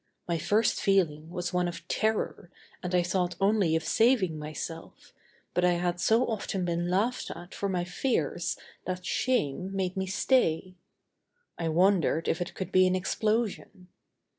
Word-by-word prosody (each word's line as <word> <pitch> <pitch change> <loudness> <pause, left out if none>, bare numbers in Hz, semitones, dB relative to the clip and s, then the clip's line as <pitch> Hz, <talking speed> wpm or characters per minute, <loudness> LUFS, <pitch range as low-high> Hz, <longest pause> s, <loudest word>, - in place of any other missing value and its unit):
My 170 -2 0
first 215 +7 +2
feeling 165 -6 +1
was 175 0 -4
one 180 0 +1
of 175 - -7
terror 220 -5 -1 0.3
and 180 0 -2
I 175 - +4
thought 180 0 0
only 195 -5 +3
of 160 - 0
saving 205 -7 +2
myself, 155 +2 -7 0.4
but 180 - +1
I 180 0 +4
had 175 0 -1
so 225 +7 +3
often 195 -4 -2
been 175 0 -1
laughed 215 +8 0
at 175 +2 -11
for 200 - -2
my 180 -2 0
fears 175 - -1 0.3
that 185 -1 -4
shame 185 - 0
made 185 -1 -1
me 190 0 -2
stay. 185 -4 +1 0.9
I 165 -1 -1
wondered 175 -1 +3
if 170 - 0
it 175 - -4
could 190 -1 -5
be 185 0 +5
an 185 - +2
explosion. 210 -1 -1
180 Hz, 160 wpm, -29 LUFS, 175-195 Hz, 0.9 s, be